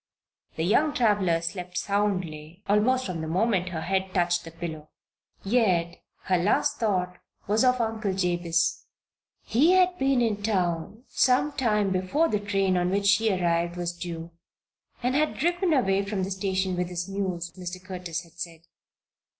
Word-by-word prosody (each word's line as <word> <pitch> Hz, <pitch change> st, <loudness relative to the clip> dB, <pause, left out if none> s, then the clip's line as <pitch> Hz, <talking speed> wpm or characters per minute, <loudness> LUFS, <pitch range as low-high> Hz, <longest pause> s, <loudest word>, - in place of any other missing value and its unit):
The 160 Hz, -, -2 dB
young 290 Hz, -, +2 dB
traveler 200 Hz, -8 st, +2 dB
slept 180 Hz, +1 st, -5 dB
soundly 185 Hz, -4 st, -2 dB
almost 255 Hz, +6 st, +2 dB
from 180 Hz, -4 st, -4 dB
the 160 Hz, -, -4 dB
moment 185 Hz, +1 st, +1 dB
her 165 Hz, -2 st, -4 dB
head 190 Hz, +2 st, -1 dB
touched 175 Hz, -1 st, +2 dB
the 165 Hz, -, -8 dB
pillow. 160 Hz, -2 st, -7 dB, 0.5 s
Yet 190 Hz, -6 st, +1 dB, 0.2 s
her 185 Hz, -2 st, +1 dB
last 180 Hz, +5 st, +1 dB
thought 180 Hz, -5 st, -1 dB, 0.3 s
was 215 Hz, +4 st, +2 dB
of 255 Hz, 0 st, +3 dB
Uncle 220 Hz, -3 st, -1 dB
Jabez. 175 Hz, -2 st, 0 dB, 0.6 s
He 290 Hz, +11 st, +3 dB
had 365 Hz, -1 st, +4 dB
been 270 Hz, -1 st, +2 dB
in 220 Hz, -4 st, 0 dB
town 190 Hz, +1 st, -1 dB
some 260 Hz, +3 st, +2 dB
time 210 Hz, -8 st, +1 dB
before 190 Hz, -, +1 dB
the 210 Hz, -, 0 dB
train 195 Hz, -2 st, +1 dB
on 175 Hz, 0 st, +1 dB
which 200 Hz, +2 st, 0 dB
she 210 Hz, +2 st, +4 dB
arrived 170 Hz, -2 st, 0 dB
was 175 Hz, 0 st, -2 dB
due 170 Hz, -1 st, -6 dB, 0.7 s
and 250 Hz, +1 st, +1 dB
had 305 Hz, +2 st, +1 dB
driven 350 Hz, +2 st, +1 dB
away 200 Hz, -9 st, +2 dB
from 200 Hz, -1 st, -2 dB
the 190 Hz, -, -3 dB
station 190 Hz, -1 st, -1 dB
with 180 Hz, 0 st, -2 dB
his 180 Hz, 0 st, -4 dB
mules, 185 Hz, -3 st, -3 dB
Mr. 180 Hz, 0 st, -7 dB
Curtis 180 Hz, -2 st, -6 dB
said. 165 Hz, -2 st, -6 dB
190 Hz, 160 wpm, -26 LUFS, 175-220 Hz, 0.7 s, had